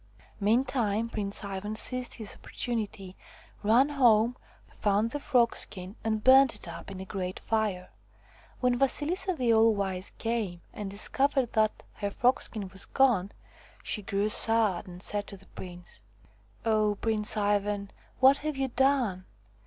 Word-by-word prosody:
Meantime 230 0 +1
Prince 205 -2 -3
Ivan 200 +2 -4
seized 250 +2 -4
his 220 -4 -6
opportunity, 205 -6 -4 0.5
ran 235 +7 +4
home, 240 -4 +4 0.3
found 210 +2 0
the 290 - -3
frogskin, 230 -7 0
and 220 -1 -1
burnt 265 -2 +7
it 210 - -7
up 170 - -8
in 195 -1 -7
a 190 - -6
great 185 -1 -4
fire. 210 -5 -1 0.7
When 250 -1 +2
Vasilisa 330 +7 0
the 245 -5 +2
All 225 0 +5
Wise 190 -1 -3
came 220 -7 -2
and 205 -2 -5
discovered 265 +5 0
that 215 -1 +1
her 205 - -2
frogskin 220 -3 0
was 190 +1 -9
gone, 230 -8 +2 0.5
she 210 - -1
grew 200 +1 -1
sad 215 -4 +2
and 180 +1 -10
said 205 -1 -3
to 200 - -9
the 195 - -19
prince: 175 - -10 0.6
"Oh, 215 -2 +2
Prince 220 -1 +1
Ivan, 205 -1 0 0.3
what 265 +2 +7
have 305 -1 -4
you 270 -1 0
done? 245 -8 +1
215 Hz, 145 wpm, -29 LUFS, 200-245 Hz, 0.7 s, burnt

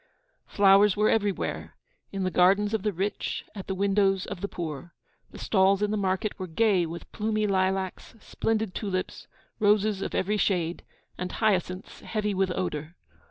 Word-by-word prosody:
Flowers 200 0 +5
were 210 +1 +3
everywhere, 205 -3 -1 0.4
in 195 -1 -3
the 185 - 0
gardens 195 +4 +3
of 220 - 0
the 210 +1 0
rich, 195 +3 -3
at 195 -3 -8
the 190 - -2
windows 195 -1 +2
of 200 -3 -7
the 200 - -1
poor. 165 -3 -6 0.3
The - - -12
stalls 195 0 +2
in 210 - +1
the - - 0
market 195 +1 -1
were 185 - -4
gay 185 0 +2
with 170 +1 -8
plumy 215 0 -1
lilacs, 190 +1 -1
splendid 220 -3 -2
tulips, 185 -3 -4 0.3
roses 210 -1 +3
of - - -3
every 210 +3 +1
shade, 175 -4 0 0.4
and 180 0 -3
hyacinths 185 -3 -1
heavy 210 -2 -2
with 190 0 +1
odour. 170 -3 -3
195 Hz, 160 wpm, -27 LUFS, 185-210 Hz, 0.4 s, Flowers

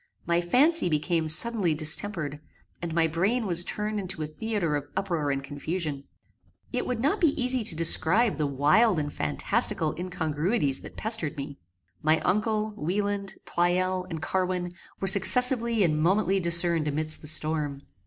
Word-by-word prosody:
My 170 0 +1
fancy 275 - +3
became 160 +1 -1
suddenly 180 +1 +4
distempered, 155 -1 +2 0.4
and 170 -1 -5
my 165 0 +1
brain 195 +10 -1
was 175 -3 +2
turned 210 +3 -3
into 185 -4 -5
a - - -2
theatre 170 0 -3
of 145 0 -4
uproar 170 -7 -2
and 140 0 -2
confusion. 145 0 -4 0.7
It - - -2
would 250 - -2
not 300 - 0
be 305 -4 +2
easy 250 -1 0
to 195 -6 -3
describe 175 +7 +4
the 150 -2 -1
wild 150 - +2
and 145 -1 -3
phantastical 75 - 0
incongruities 160 - -1
that - - -12
pestered 215 -11 +2
me. 140 0 -7 0.4
My 155 +1 +2
uncle, 215 +2 -1
Wieland, 200 +3 -3
Pleyel 180 +1 -1
and 160 -3 -6
Carwin 180 0 -2 0.3
were 195 - -3
successively 235 +3 +3
and 155 -3 0
momently 195 +3 +1
discerned 170 -2 +2
amidst 155 +1 0
the 150 - -9
storm. 155 -2 -2
175 Hz, 155 wpm, -26 LUFS, 155-210 Hz, 0.7 s, suddenly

